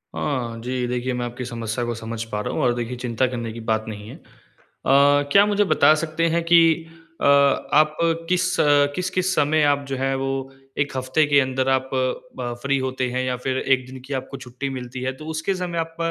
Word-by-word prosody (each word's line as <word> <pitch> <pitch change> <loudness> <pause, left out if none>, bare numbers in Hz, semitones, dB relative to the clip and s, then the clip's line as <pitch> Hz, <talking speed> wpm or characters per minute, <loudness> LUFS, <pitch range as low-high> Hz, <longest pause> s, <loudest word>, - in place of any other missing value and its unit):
हाँ, 120 -6 -2
जी। 125 0 -2
देखिए, 125 +1 -2
मैं 120 0 -2
आपकी 120 +1 -6
समस्या 115 0 -4
को 120 - -2
समझ 115 0 -5
पा 105 - -3
रहा - - -4
हूँ - - -1
और 120 - +3
देखिए, 120 +1 -4
चिंता 120 +1 0
करने 120 -3 -4
की 115 - -8
बात 110 0 -1
नहीं 105 -1 -7
है। - - -9
अ, - - -17 1.1
क्या 200 +1 +6
मुझे 205 0 +2
बता 155 -4 +5
सकते 165 +1 0
हैं 170 - +1
कि 165 -1 +4 0.3
अ, - - 0 0.5
आप 155 +1 +4 0.3
किस 180 0 +1 0.4
किस-किस 185 0 -1
समय 150 +1 +2
आप 140 0 -1
जो 135 - -3
हैं, 135 +1 0
वो 135 0 -3 0.3
1 140 -1 -1
हफ़्ते 130 +4 +1
के 145 -1 +5
अंदर 130 0 -1
आप 130 0 +1
ब 130 -1 -3
फ्री 140 0 +1
होते 130 -1 -2
हैं 130 +1 -1
या 130 -1 -1
फिर 130 0 0
1 130 -2 +1
दिन 130 0 -9
की 140 - -6
आपको 130 +1 -5
छुट्टी 130 +2 -6
मिलती 125 -1 -6
है? 130 +1 -1
तो 155 +4 -11
उसके 160 +5 -1
समय 175 -2 -3
आप 165 0 -4
130 Hz, 210 wpm, -22 LUFS, 125-155 Hz, 1.1 s, क्या